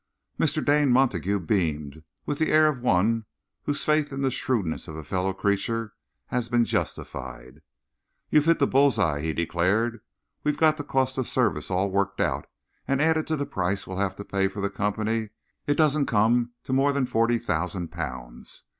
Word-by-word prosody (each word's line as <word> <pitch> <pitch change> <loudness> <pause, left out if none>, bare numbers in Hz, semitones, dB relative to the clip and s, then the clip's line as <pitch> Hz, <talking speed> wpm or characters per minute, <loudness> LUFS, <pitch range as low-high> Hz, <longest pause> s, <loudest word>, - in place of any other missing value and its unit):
Mr. - - +1
Dane 145 -1 +4
Montague 100 - +2
beamed, 80 -5 -1 0.2
with 145 - -3
the 160 - +1
air 155 0 +6
of 145 -5 +1
one 115 +1 +2 0.4
whose 145 0 -1
faith 150 -1 +2
in 135 0 -3
the 135 - +2
shrewdness 115 -10 -2
of 80 - -7
a 80 - -7
fellow 90 +5 -1
creature 105 +3 -1 0.4
has 120 -1 -1
been 120 -1 +3
justified. 65 - -4 0.7
"You've 150 -1 +4
hit 165 0 +4
the 140 - +3
bull's 135 -1 +3
eye," 80 -8 +1
he 80 +1 -1
declared. 90 +8 0 0.4
"We've 150 - 0
got 155 -1 +4
the 145 - -4
cost 130 -2 0
of 130 - -2
service 125 -5 +1
all 95 +1 0
worked 100 0 0
out, - - 0 0.4
and, 135 0 +1
added 160 +1 +2
to 160 - 0
the 145 -1 -2
price 100 -7 -2
we'll 95 - -6
have 95 -1 -1
to 100 - -8
pay 95 -1 +1
for 100 +1 -7
the 100 0 -1
Company, 110 +2 -1 0.4
it 145 - +2
don't 150 -2 +3
come 120 +3 +2
to 130 - -3
more 140 +2 +3
than 140 -2 +1
forty 120 -1 +2
thousand 90 -2 -2
pounds. 65 -8 -6
110 Hz, 185 wpm, -26 LUFS, 90-135 Hz, 0.7 s, air